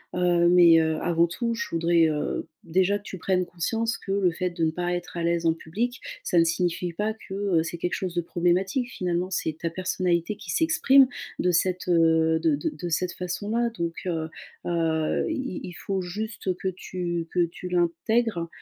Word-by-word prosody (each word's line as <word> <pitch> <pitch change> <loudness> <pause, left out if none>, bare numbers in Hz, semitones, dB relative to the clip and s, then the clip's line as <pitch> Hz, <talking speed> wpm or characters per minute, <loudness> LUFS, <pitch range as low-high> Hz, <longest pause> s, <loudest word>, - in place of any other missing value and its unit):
Heu, 175 -1 +3
mais, 175 -2 +7
heu, 160 -1 +1
avant 170 -1 +3
tout, 235 +7 -2
je - - -3
voudrais, 165 0 +3
heu, 150 -1 -2 0.2
déjà 190 +4 +2
que - - -22
tu 190 - -7
prennes 180 +1 0
conscience 225 +7 -2
que 195 - -7
le 195 -3 +3
fait 180 +2 -2
de 170 -1 -3
ne 160 - +1
pas 175 +1 -2
être 175 0 -5
à 170 - -2
l'aise 170 0 +1
en 160 - +4
public, 225 +11 -3 0.2
ça 175 - 0
ne 165 - +7
signifie 175 +1 -1
pas 210 +4 -1
que, 210 -3 -11 0.3
heu, - - +1
c'est 170 +1 -5
quelque 180 - -1
chose 185 -2 -3
de 175 - 0
problématique. 185 +9 0
Finalement, 180 +1 -2
c'est 160 -3 -2
ta 165 -1 -2
personnalité 180 +1 0
qui - - -7
s'exprime 275 -5 +5 0.3
de 180 - +2
cette, 180 +2 +1
heu, 160 -1 +4
de 160 -3 +2
de 145 - -2
de 170 +3 -6
cette 175 +2 0
façon-là, 215 +6 -2
donc, 170 -6 -3
heu, 160 -2 -2 0.4
heu, 160 -2 +1
il 265 - -3
il 180 - -7
faut 190 +2 -3
juste 200 +1 -3
que 190 - -4
tu 175 -2 -4
que 175 -1 +3
tu 175 +2 -8
l'intègres, 175 +2 +1
175 Hz, 195 wpm, -26 LUFS, 165-190 Hz, 0.4 s, mais